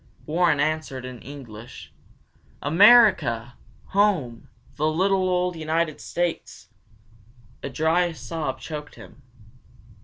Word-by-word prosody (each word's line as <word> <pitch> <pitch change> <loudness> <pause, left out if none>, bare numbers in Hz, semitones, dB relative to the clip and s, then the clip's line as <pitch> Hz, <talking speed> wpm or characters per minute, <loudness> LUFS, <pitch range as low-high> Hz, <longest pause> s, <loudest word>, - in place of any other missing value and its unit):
Warren 165 -1 +2
answered 150 -4 -2
in 125 -2 -9
English. 120 -4 -11 0.7
"America. 165 - +5 0.4
Home, 185 - 0 0.3
the 155 - 0
little 185 +3 +1
old 180 0 0
United 160 0 -2
States!" 175 -1 -4 0.9
A - - -5
dry 160 +5 +1
sob 160 -4 -5
choked 150 -2 -8
him. - - -15
155 Hz, 95 wpm, -24 LUFS, 140-180 Hz, 0.9 s, America